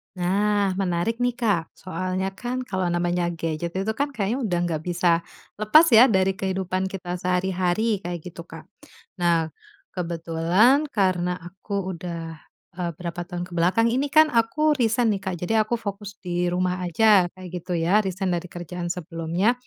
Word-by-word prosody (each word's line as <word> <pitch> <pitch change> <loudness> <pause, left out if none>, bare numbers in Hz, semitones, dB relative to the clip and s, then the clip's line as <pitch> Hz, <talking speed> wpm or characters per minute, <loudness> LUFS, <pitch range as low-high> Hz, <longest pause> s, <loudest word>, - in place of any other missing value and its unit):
Nah 200 +2 +1
menarik 190 +5 -1
nih 245 -1 +1
Kak, 205 -9 0
soalnya 185 +1 -3
kan 250 +5 -4
kalau 190 -6 -2
namanya 175 0 0
gadget 165 +1 -4
itu 195 +3 0
kan 285 +5 -2
kayaknya 220 +4 -1
udah 175 -3 0
nggak 165 -3 -2
bisa 175 -1 +2 0.4
lepas 215 +10 +6
ya 235 +3 +9
dari 190 -4 +3
kehidupan 190 0 -1
kita 180 -2 -5
sehari-hari, 185 +4 0
kayak 175 -3 -5
gitu 170 -1 -9
Kak. - - -11 0.5
Nah, 165 -2 +2 0.4
kebetulan 175 - +2
karena 180 -3 +1
aku 190 +2 -5
udah 165 -1 -6 0.4
eee, 175 -2 -2
berapa 175 -1 -5
tahun 175 -1 -5
ke - - -11
belakang 185 +7 +3
ini 260 +5 0
kan 310 0 +7
aku 295 +7 +2
resign 230 -1 +2
nih 195 - -4
Kak, 190 -2 -2
jadi 180 +5 -1
aku 225 +3 -1
fokus 200 -1 -6
di 175 -1 -1
rumah 180 +1 0
aja 195 +1 +4
kayak 185 -1 -9
gitu 180 +2 -4
ya, 170 +6 +3
resign 190 -1 -2
dari 175 +1 -3
kerjaan 175 0 -6
sebelumnya. 170 +5 0
185 Hz, 160 wpm, -24 LUFS, 175-210 Hz, 0.5 s, ya